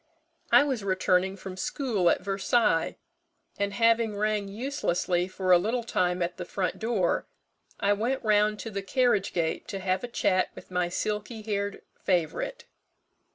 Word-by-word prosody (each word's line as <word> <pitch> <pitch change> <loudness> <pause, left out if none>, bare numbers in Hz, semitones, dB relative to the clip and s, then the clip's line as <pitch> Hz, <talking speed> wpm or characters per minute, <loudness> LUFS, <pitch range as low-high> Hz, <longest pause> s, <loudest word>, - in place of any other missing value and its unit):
I - - +8
was 265 -7 -2
returning 185 0 +1
from 190 -1 -7
school 205 - 0
at - - +2
Versailles; 195 -2 +1 0.6
and 200 0 0
having 230 0 +2
rang 210 -1 0
uselessly 195 -6 -1
for 185 0 -1
a 175 - +8
little 230 +6 -1
time 180 -5 0
at 175 +1 -3
the 180 - -4
front 185 +1 -2
door, 220 -6 0 0.5
I 205 -1 +3
went 235 +6 -1
round 210 -1 +3
to 225 - -6
the 200 -1 -3
carriage 210 -1 +1
gate 165 -2 -1
to 195 - -4
have 190 +1 -1
a - - -2
chat 185 -5 +1
with - - -12
my 180 -1 0
silky 210 +4 -3
haired 200 -1 -3 0.2
favourite. 195 - -1
200 Hz, 155 wpm, -28 LUFS, 185-225 Hz, 0.6 s, I